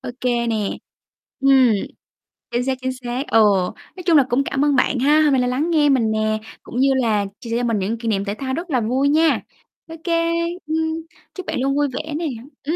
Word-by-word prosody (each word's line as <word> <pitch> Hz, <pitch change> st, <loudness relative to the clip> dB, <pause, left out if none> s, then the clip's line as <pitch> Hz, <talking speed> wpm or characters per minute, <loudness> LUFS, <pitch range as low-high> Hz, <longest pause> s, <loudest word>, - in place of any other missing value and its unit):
Ô -, -, -6 dB
kê 240 Hz, -1 st, 0 dB
nè. 225 Hz, -, 0 dB, 0.8 s
Ừm. 265 Hz, -3 st, +5 dB, 0.8 s
Chính 240 Hz, +1 st, 0 dB
xác, 265 Hz, -1 st, -1 dB
chính 260 Hz, 0 st, -1 dB
xác, 250 Hz, +2 st, -4 dB
ừ. 225 Hz, -, +4 dB, 0.6 s
Nói 365 Hz, -, -9 dB
chung 335 Hz, -3 st, +5 dB
là 280 Hz, -, +6 dB
cũng 250 Hz, +3 st, +2 dB
cảm 275 Hz, +1 st, 0 dB
ơn 290 Hz, -2 st, +2 dB
bạn 250 Hz, 0 st, +2 dB
ha, 295 Hz, +4 st, +4 dB
hôm 300 Hz, -, +4 dB
nay 255 Hz, -, +3 dB
là 250 Hz, -, +1 dB
lắng 280 Hz, +7 st, 0 dB
nghe 300 Hz, -3 st, +3 dB
mình 235 Hz, -5 st, +2 dB
nè, 215 Hz, 0 st, 0 dB, 0.2 s
cũng 245 Hz, -, -8 dB
như 275 Hz, +1 st, +4 dB
là 220 Hz, -6 st, +1 dB
chia 230 Hz, -, -9 dB
sẻ 230 Hz, -, 0 dB
cho 245 Hz, -, -1 dB
mình 230 Hz, -3 st, 0 dB
những 210 Hz, +5 st, -2 dB
kỷ 230 Hz, -, -6 dB
niệm 200 Hz, -2 st, 0 dB
thể 200 Hz, -, -2 dB
thao 260 Hz, 0 st, -4 dB
rất 340 Hz, +4 st, -4 dB
là 255 Hz, -4 st, +1 dB
vui 260 Hz, +5 st, +1 dB
nha. 315 Hz, +2 st, +3 dB, 0.5 s
Ô 325 Hz, -, -8 dB
kê, 335 Hz, -1 st, +1 dB, 0.4 s
ừm, 320 Hz, 0 st, -1 dB, 0.4 s
chúc 370 Hz, -, -7 dB
bạn -, -, -3 dB
luôn 275 Hz, +1 st, +1 dB
vui 290 Hz, 0 st, +2 dB
vẻ 305 Hz, +4 st, -5 dB
nè. 325 Hz, +2 st, -2 dB, 0.4 s
Ừm, 315 Hz, +4 st, -1 dB
265 Hz, 235 wpm, -21 LUFS, 235-300 Hz, 0.8 s, là